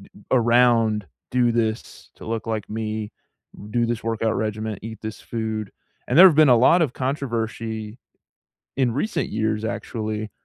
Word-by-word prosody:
eh - - -16
around, 115 -3 +3 0.3
"Do 120 -1 +3
this 115 -1 -3
to - - -12
look 115 0 -4
like 110 -2 -3
me, 110 -1 -4 0.6
do 120 +2 +1
this 115 -1 -3
workout 115 -1 -1
regimen, 110 -1 -3
eat 110 0 -8
this 110 -1 -7
food." 110 -3 -4 0.4
And - - +1
there 185 - +11
have 175 -5 +7
been 155 -2 +6
a 120 - +7
lot 150 +9 +5
of 145 -6 0
controversy 115 -5 -3 0.8
in 130 -3 +1
recent 145 - -2
years, 110 0 -1
actually, 110 -2 -4
115 Hz, 155 wpm, -23 LUFS, 110-120 Hz, 0.8 s, there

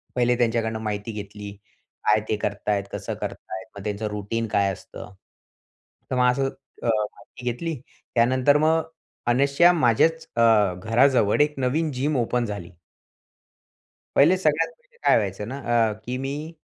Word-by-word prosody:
पहिले 125 0 +3
त्यांच्याकडनं 115 -2 0
माहिती 105 0 -4
घेतली. 105 -1 -7 0.5
काय 105 0 +4
ते 110 - +2
करत 105 0 -3
आहेत, 100 -1 +1
कसं - - -4
करत - - -3 0.2
आहेत. 95 0 -5
मग 100 - -8
त्यांचं 105 +1 -3
रुटीन 105 +2 -3
काय 100 -2 +1
असतं. 100 - -11 1.0
तर 130 - +1
मग 125 0 +4
असं 135 +1 0 0.3
अ, - - -2
माहिती 115 +3 -3
घेतली. 165 +7 -4 0.4
त्यानंतर 130 +4 +4
मग 160 +1 +3 0.4
अनायसे 140 +8 +5
माझ्याच 160 +3 +2
अ, 115 - +2 0.4
घराजवळ 120 0 +3
एक 150 0 +2
नवीन 150 +5 0
जिम 135 +2 -1
ओपन 120 0 0
झाली. 100 -4 -6 1.4
पहिले 165 +7 +6
सगळ्यात 160 -2 +2
पहिले - - -30
काय - - +5
व्हायचं 105 -1 -2
ना 135 +4 -5 0.3
अ, 105 - -3
की 125 +1 -3
मी 145 +5 -5
120 Hz, 150 wpm, -24 LUFS, 105-140 Hz, 1.4 s, पहिले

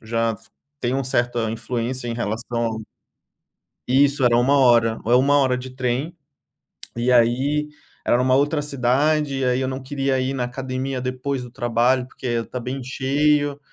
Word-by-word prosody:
já 115 +1 -1
f 110 - -9 0.3
tem 125 +2 -1
um 135 -1 -1
certa 120 -3 0
influência 120 +2 -3
em 115 - -2
relação 115 0 -3 1.1
Isso 140 +1 +3
era 120 -1 +4
1 135 +4 +3
hora, 120 -4 +4
é 120 - +4
1 140 +3 +4
hora 130 -2 +2
de 130 +1 -8
trem, 130 +6 -2 0.8
e 120 +2 0
aí 130 +5 +2 0.4
era 120 - +3
uma 130 0 +3
outra 145 +2 +2
cidade, 140 +1 +1
e 130 - 0
aí 125 0 +1
eu 130 - -1
não 130 0 -5
queria 135 -1 -1
ir 130 +1 -1
na 125 -2 -1
academia 130 +1 -4
depois 130 +1 -3
do 120 - -10
trabalho, 125 +1 +1
porque 130 - -13
ia 120 -1 0
estar 125 +2 -6
bem 130 +3 -4
cheio, 145 +2 +1
130 Hz, 170 wpm, -22 LUFS, 120-135 Hz, 1.1 s, era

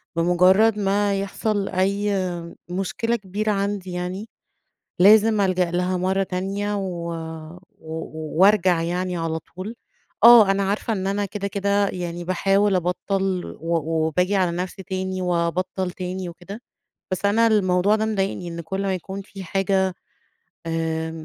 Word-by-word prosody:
بمُجرّد 185 +6 +4
ما 200 0 +1
يحصل 200 +1 -2
أي 200 +2 0 0.6
مشكلة 195 +6 -1
كبيرة 210 0 -2
عندي 200 -2 -2
يعني، 180 +5 -4 0.7
لازم 215 +3 +6
ألجأ 185 -3 +1
لها 180 +1 0
مرّة 190 +2 +1
تانية، 195 +2 -2
و 175 -4 -4 0.7
و 160 0 -6
وارجع 185 -4 +4
يعني 180 +2 -2
على 165 -1 -2
طول. 185 +7 -8 0.5
آه، 230 -4 +9
أنا 195 0 +1
عارفة 205 +3 -1
إن 190 -3 -2
أنا 200 +1 0
كده، 200 0 -4
كده 200 0 +1
يعني 175 -2 -5
باحاول 195 +3 +2
أبطّل، 185 +1 -2
و 170 +1 0 0.3
وباجي 180 +5 +1
على 180 -3 +1
نفسي 185 +2 -4
تاني 185 0 -3
وابطّل 180 +1 -1
تاني 185 0 -5
وكده. 185 +6 -10 0.5
بس 185 +2 -2
أنا 225 +3 +4
الموضوع 200 -2 +3
ده 220 0 0
مضايقني، 195 -4 -2
إن 170 0 -5
كل 190 +4 -4
ما 195 -1 0
يكون 190 +2 -6
في 195 -1 -10
حاجة 190 0 0 0.7
آآ 160 0 -2
190 Hz, 140 wpm, -23 LUFS, 180-200 Hz, 0.7 s, آه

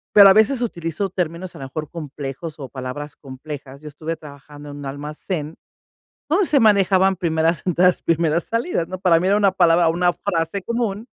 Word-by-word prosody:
Pero 200 -1 +10
a - - +7
veces 220 +5 +3
utilizo 180 -3 -3
términos, 175 0 -4
a 160 - -10
lo 135 - -6
mejor, 150 +2 -6
complejos 150 0 -7
o 135 - -6
palabras 135 +3 -7
complejas. 140 0 -9
Yo 155 - -10
estuve 160 +3 -5
trabajando 145 0 -12
en 145 - -8
un 145 - -8
almacén 150 +3 -5 0.7
donde 360 +5 +2
se 285 -4 +3
manejaban 195 -3 +4
primeras 165 -2 0
entradas, 180 0 +3
primeras 165 0 +1
salidas, 230 - -1
¿no? 185 +1 -6
Para 175 -3 +4
mí, 185 - -1
era 200 - +3
una 200 -2 +3
palabra 170 -2 +4
una 175 +2 +2
frase 175 0 -2
común, 230 -1 -2
165 Hz, 180 wpm, -21 LUFS, 150-190 Hz, 0.7 s, Pero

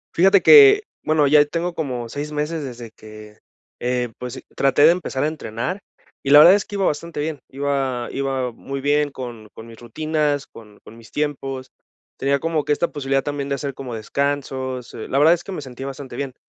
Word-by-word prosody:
Fíjate 195 +2 +5
que 420 -2 +9 0.2
bueno, 155 -1 +2
ya 145 +1 +6
tengo 170 +3 -3
como 125 -8 -4
6 145 +5 -6
meses 150 +1 -3
desde 120 -4 -8
que, 110 -1 -14 0.4
eh, 125 0 -1
pues 125 +1 -6
e - - -10
traté 135 +1 +3
de 160 - +8
empezar 170 -6 -2
a - - +2
entrenar, 155 - -4 0.4
y 135 - -4
la 145 - +8
verdad 165 +5 +9
es 200 -1 +1
que 205 - -8
iba 195 -1 0
bastante 150 +1 -2
bien. 150 0 -3
Iba 135 -3 -2
iba 135 -2 -2
muy 135 +4 -7
bien 145 +1 +1
con 120 -5 -9
con 110 - -10
mis 115 -1 -13
rutinas, 150 +3 -1
con 105 -2 -15
con 115 - -14
mis 115 -2 -16
tiempos. 135 -3 -4 0.5
Tenía 140 +1 +1
como 160 0 -1
que 150 - +1
esta 170 +3 -1
posibilidad 135 -1 -1
también 145 -1 -4
de 140 - 0
hacer 140 0 -4
como 130 -3 -7
descansos. 130 +1 -3
Eh, 110 - -7
la 135 - -1
verdad 155 +4 +6
es 175 0 -3
que - - -8
me 180 - -5
sentí 130 -1 -9
bastante 135 -2 -7
bien. 135 -1 -4
140 Hz, 210 wpm, -21 LUFS, 125-150 Hz, 0.5 s, que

